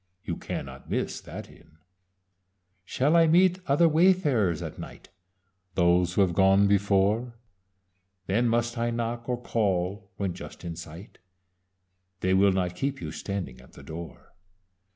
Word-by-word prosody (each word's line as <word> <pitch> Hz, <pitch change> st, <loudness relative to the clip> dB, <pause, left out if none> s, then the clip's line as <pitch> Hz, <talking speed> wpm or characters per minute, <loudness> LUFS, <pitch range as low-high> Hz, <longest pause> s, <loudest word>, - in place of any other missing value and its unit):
You 85 Hz, -, -3 dB
cannot -, -, -7 dB
miss -, -, -2 dB
that -, -, -9 dB
Inn. 80 Hz, -, -20 dB, 1.1 s
"Shall 140 Hz, -, +1 dB
I 165 Hz, -1 st, +6 dB
meet 180 Hz, +3 st, +4 dB
other 145 Hz, +5 st, +4 dB
wayfarers 150 Hz, -, +3 dB
at -, -, -7 dB
night? -, -, -10 dB, 0.7 s
Those 90 Hz, 0 st, +3 dB
who -, -, +4 dB
have 95 Hz, -3 st, +2 dB
gone 95 Hz, +2 st, +4 dB
before. 100 Hz, +4 st, +2 dB, 0.9 s
Then 115 Hz, +6 st, +1 dB
must 120 Hz, +1 st, 0 dB
I 120 Hz, 0 st, 0 dB
knock, 120 Hz, +1 st, -3 dB
or 125 Hz, -1 st, -1 dB
call 100 Hz, -3 st, -1 dB
when 95 Hz, -3 st, -2 dB
just 90 Hz, -, -10 dB
in 85 Hz, -1 st, -5 dB
sight? 85 Hz, +3 st, -11 dB, 1.0 s
They 95 Hz, 0 st, +1 dB
will 100 Hz, +1 st, +5 dB
not 90 Hz, -1 st, -1 dB
keep 135 Hz, +7 st, -2 dB
you -, -, -6 dB
standing 95 Hz, -11 st, -5 dB
at 65 Hz, -, -19 dB
the -, -, -13 dB
door. 85 Hz, +1 st, -9 dB
100 Hz, 145 wpm, -27 LUFS, 90-120 Hz, 1.1 s, I